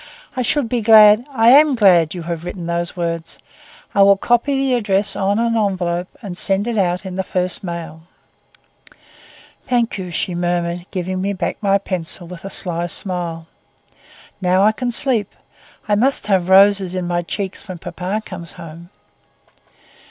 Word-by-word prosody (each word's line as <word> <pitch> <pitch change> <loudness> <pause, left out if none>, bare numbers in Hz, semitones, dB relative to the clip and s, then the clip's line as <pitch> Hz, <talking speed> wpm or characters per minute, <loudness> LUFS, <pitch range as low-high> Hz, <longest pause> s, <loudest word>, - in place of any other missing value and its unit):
"I 255 - -1
should 255 +1 0
be 240 0 -1
glad—I 225 +3 +5
am 285 +2 +6
glad 180 -8 +4
that - - -8
you 175 - -6
have 170 -1 -5
written 180 0 -6
these 170 +1 -3
words. 170 -1 -4 0.6
I 200 - +3
will 200 0 +6
copy 240 +6 +1
the 270 -1 0
address 205 -4 0
on 195 +1 0
an 230 0 0
envelope 180 -4 -1 0.2
and 190 -4 -6
send 195 +1 +3
it 235 -1 -3
out 180 -2 0
in 185 -1 -6
the 190 - -1
first 180 0 -3
mail." 170 -3 -7 1.7
"Thank 235 -4 0
you," 180 -1 -6
she 175 +1 -3
murmured, 175 0 -2
giving 185 0 -4
me 200 +1 -1
back 190 - -3
my 200 -1 +3
pencil 185 -2 -4
with 170 0 -11
a 195 - -6
sly 175 -3 +2
smile. 175 -3 -3 1.0
"Now 185 +1 +2
I 215 - +5
can 245 +3 -4
sleep. 235 -4 +1 0.5
I 210 - +1
must 250 +3 +1
have 190 -3 0
roses 195 -1 +4
in 180 -1 -3
my 175 0 -1
cheeks 190 +3 -6
when 185 -2 -7
papa 185 +5 -5
comes 170 -1 -9
home." 170 0 -11
190 Hz, 165 wpm, -18 LUFS, 175-215 Hz, 1.7 s, am